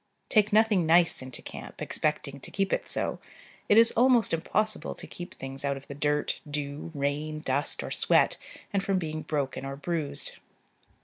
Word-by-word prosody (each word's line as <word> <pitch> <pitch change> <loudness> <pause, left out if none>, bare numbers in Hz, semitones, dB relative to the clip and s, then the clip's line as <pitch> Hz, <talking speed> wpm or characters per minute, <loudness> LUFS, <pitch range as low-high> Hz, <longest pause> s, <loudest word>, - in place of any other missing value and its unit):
Take 215 -2 +4
nothing 210 -5 +4
nice 170 -1 +4
into 130 -1 -7
camp, - - -9
expecting 145 -2 -1
to - - -8
keep 195 -1 0
it - - -1
so: - - 0 0.5
it 210 - +6
is 230 0 +8
almost 245 -4 +4
impossible 215 +6 0
to - - -7
keep 175 0 -9
things 135 +1 -7
out 140 -1 0
of 135 - -11
the - - -6
dirt, 145 +1 0
dew, 145 +2 -4
rain, 145 +2 -1
dust, 145 -1 -1
or - - -6
sweat, - - +3 0.4
and 200 - +2
from 195 -1 +1
being 155 -3 -3
broken 140 -4 -2
or 135 0 -4
bruised. 145 -2 -3
155 Hz, 175 wpm, -28 LUFS, 140-195 Hz, 0.5 s, is